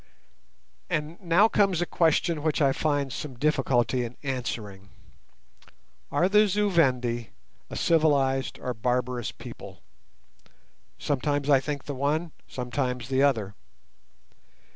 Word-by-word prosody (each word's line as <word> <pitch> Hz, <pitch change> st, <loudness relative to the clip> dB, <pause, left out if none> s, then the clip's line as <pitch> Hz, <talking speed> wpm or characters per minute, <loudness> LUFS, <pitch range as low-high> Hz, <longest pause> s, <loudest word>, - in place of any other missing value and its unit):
And 165 Hz, 0 st, -3 dB
now 180 Hz, +4 st, +4 dB
comes 195 Hz, -5 st, +2 dB
a 175 Hz, -, +1 dB
question 165 Hz, -1 st, +1 dB
which 155 Hz, 0 st, 0 dB
I 140 Hz, -3 st, +4 dB
find 145 Hz, -4 st, -1 dB
some 140 Hz, -4 st, -6 dB
difficulty 130 Hz, -3 st, +1 dB
in 120 Hz, +1 st, -7 dB
answering. 110 Hz, -7 st, -4 dB, 1.2 s
Are 180 Hz, -, +3 dB
the 210 Hz, +2 st, +5 dB
Zu 205 Hz, +1 st, +1 dB
Vendi 125 Hz, -, +1 dB, 0.4 s
a -, -, -7 dB
civilized 140 Hz, -5 st, +2 dB
or 125 Hz, -, -4 dB
barbarous 125 Hz, +1 st, -1 dB
people? -, -, -11 dB, 1.1 s
Sometimes 145 Hz, 0 st, -1 dB
I 135 Hz, -, +6 dB
think 145 Hz, 0 st, -4 dB
the 145 Hz, -, -5 dB
one, 150 Hz, +5 st, -1 dB, 0.2 s
sometimes 125 Hz, -1 st, -3 dB
the 135 Hz, 0 st, +2 dB
other. 110 Hz, -8 st, +1 dB
140 Hz, 120 wpm, -26 LUFS, 125-160 Hz, 1.2 s, I